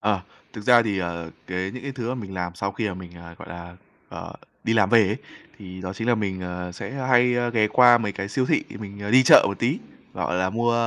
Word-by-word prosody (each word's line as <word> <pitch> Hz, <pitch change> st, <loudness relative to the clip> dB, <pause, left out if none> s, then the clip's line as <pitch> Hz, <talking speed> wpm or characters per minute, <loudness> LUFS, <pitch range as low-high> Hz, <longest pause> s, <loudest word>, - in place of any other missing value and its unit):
Ờ. 100 Hz, -2 st, +1 dB, 0.3 s
Thực 105 Hz, -, -8 dB
ra 120 Hz, 0 st, +6 dB
thì, 105 Hz, -4 st, -2 dB
ờ, 85 Hz, -2 st, -4 dB, 0.2 s
cái 95 Hz, +1 st, -3 dB
những 125 Hz, +4 st, -9 dB
cái 140 Hz, 0 st, -5 dB
thứ 120 Hz, -3 st, -5 dB
mà 125 Hz, -, -1 dB
mình 100 Hz, -6 st, -7 dB
làm 90 Hz, -1 st, -4 dB
sau 100 Hz, +2 st, -3 dB
khi 105 Hz, +1 st, -2 dB
mà 95 Hz, -, -5 dB
mình, 90 Hz, -1 st, -10 dB
à, 85 Hz, 0 st, -12 dB
gọi -, -, -11 dB
là, 85 Hz, 0 st, -10 dB, 0.3 s
ờ, -, -, -8 dB, 0.3 s
đi 115 Hz, -, +1 dB
làm 105 Hz, -4 st, +3 dB
về 115 Hz, -3 st, +6 dB
ấy, 105 Hz, -, -1 dB, 0.4 s
thì 95 Hz, -1 st, -10 dB
đó 90 Hz, 0 st, -5 dB
chính 110 Hz, +5 st, -4 dB
là 120 Hz, -, +5 dB
mình, 100 Hz, -4 st, -3 dB
à, 90 Hz, 0 st, -5 dB
sẽ 90 Hz, -, -7 dB
hay, 125 Hz, -2 st, +3 dB
a, 120 Hz, 0 st, 0 dB
ghé 110 Hz, -3 st, +2 dB
qua 120 Hz, 0 st, +6 dB
mấy 105 Hz, -3 st, -3 dB
cái 100 Hz, 0 st, -5 dB
siêu 130 Hz, +5 st, -1 dB
thị -, -, +2 dB, 0.2 s
mình, 100 Hz, -1 st, -9 dB
à, 100 Hz, -, -4 dB
đi 130 Hz, +2 st, +7 dB
chợ -, -, +8 dB
một -, -, -4 dB
tí, -, -, 0 dB, 0.4 s
gọi 90 Hz, -, -2 dB
là, 95 Hz, +1 st, 0 dB
mua, 120 Hz, +3 st, +1 dB
100 Hz, 265 wpm, -24 LUFS, 90-120 Hz, 0.4 s, chợ